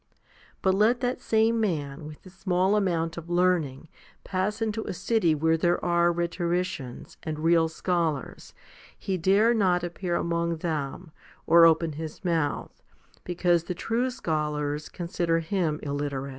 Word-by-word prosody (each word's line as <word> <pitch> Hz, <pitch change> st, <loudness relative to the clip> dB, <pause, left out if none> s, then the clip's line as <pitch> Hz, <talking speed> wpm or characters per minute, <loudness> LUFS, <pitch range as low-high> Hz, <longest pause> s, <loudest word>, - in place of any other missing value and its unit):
But 190 Hz, -, +4 dB
let 215 Hz, +5 st, +3 dB
that 250 Hz, 0 st, -1 dB
same 225 Hz, +1 st, +2 dB
man 150 Hz, -7 st, -2 dB
with 150 Hz, -1 st, -12 dB
his 185 Hz, -, -14 dB
small 190 Hz, +1 st, +1 dB
amount 170 Hz, -5 st, 0 dB
of 170 Hz, 0 st, -8 dB
learning 175 Hz, -6 st, +1 dB, 0.4 s
pass 195 Hz, +3 st, -2 dB
into 220 Hz, -1 st, -2 dB
a -, -, -4 dB
city 175 Hz, -6 st, +1 dB
where 160 Hz, +2 st, +2 dB
there 175 Hz, +2 st, +1 dB
are 170 Hz, 0 st, +3 dB
rhetoricians 170 Hz, -6 st, -3 dB
and 155 Hz, -1 st, -4 dB
real 165 Hz, +1 st, +3 dB
scholars; 165 Hz, -4 st, -2 dB, 0.4 s
he 190 Hz, -, -2 dB
dare 200 Hz, +7 st, +4 dB
not 185 Hz, -5 st, +2 dB
appear 175 Hz, 0 st, -3 dB
among 170 Hz, 0 st, -1 dB
them, 160 Hz, 0 st, -4 dB, 0.3 s
or 165 Hz, 0 st, +7 dB
open 165 Hz, 0 st, +2 dB
his 155 Hz, +4 st, -7 dB
mouth, 165 Hz, -4 st, -1 dB, 0.4 s
because 175 Hz, -1 st, +1 dB
the 180 Hz, -, -4 dB
true 230 Hz, +7 st, -1 dB
scholars 150 Hz, -, -2 dB
consider 170 Hz, -1 st, -1 dB
him 165 Hz, -2 st, -1 dB
illiterate. 140 Hz, -1 st, -3 dB
170 Hz, 145 wpm, -27 LUFS, 160-185 Hz, 0.4 s, or